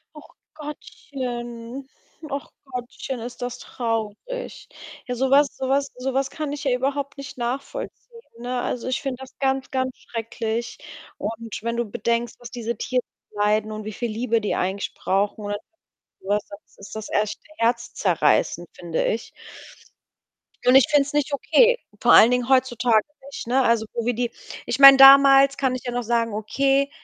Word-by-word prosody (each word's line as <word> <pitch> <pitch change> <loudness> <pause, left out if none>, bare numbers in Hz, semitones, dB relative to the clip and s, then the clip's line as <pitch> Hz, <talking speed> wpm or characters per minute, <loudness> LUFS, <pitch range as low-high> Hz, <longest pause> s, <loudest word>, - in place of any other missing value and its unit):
Och 300 - -15 0.2
Gottchen, 255 -4 -7 0.4
och 280 0 -4 0.2
Gottchen, 250 0 -6
ist 245 +1 -8
das 245 0 -4
traurig. 230 - -4 0.5
Ja, 250 - -3
so 265 +2 0
was 280 +1 +5
so 265 - -3
was 275 0 +1
so 255 +1 -3
was 270 0 0
kann 300 -2 -4
ich 290 - -5
ja 270 - +1
überhaupt 275 +3 -2
nicht 275 0 -8
nachvollziehen, 270 - -6 0.2
ne? 245 +1 -3
Also, 240 - -3
ich 260 +4 -2
finde 270 -2 -3
das 265 - -12
ganz, 265 -1 0
ganz 260 -1 -1
schrecklich. 230 0 -4 0.4
Und 225 +1 -5
wenn 235 +1 -2
du 240 - 0
bedenkst, 235 +2 -2
was 240 - -10
diese 235 -1 -4
Tiere 250 -1 -1 0.3
leiden 210 +1 +1
und 215 0 -6
wie 215 - -5
viel 235 +2 -4
Liebe 230 +1 0
die 210 - -1
eigentlich 190 +2 -2
brauchen 205 +2 -1
oder 205 0 -2 0.6
so 190 - -12
was, 205 +1 +1
das 200 +1 -14
ist 200 +2 -10
das 220 -1 -6
echt 210 0 0 0.2
herzzerreißend, 225 -7 +1
finde 170 -2 -2
ich. 225 - -2 1.4
Und 250 - +6
ich 270 - +7
finde 290 -2 +5
es 290 - -7
nicht 295 0 0
okay. 485 - +4 0.2
Vor - - +5
allen 230 - +8
Dingen 250 0 0
heutzutage 250 -4 +3 0.2
nicht, 280 - -8
ne? 255 +3 +2
Also, 230 -3 +2
wo 235 -1 -3
wir 245 - +1
die 240 +1 -1 0.4
ich 240 - -2
meine, 275 0 +11
damals 275 0 +8
kann 265 -2 0
ich 255 - -5
ja 245 - -3
noch 245 0 -1
sagen: 230 -1 0
„Okay, 270 +6 +1
245 Hz, 175 wpm, -23 LUFS, 225-270 Hz, 1.4 s, meine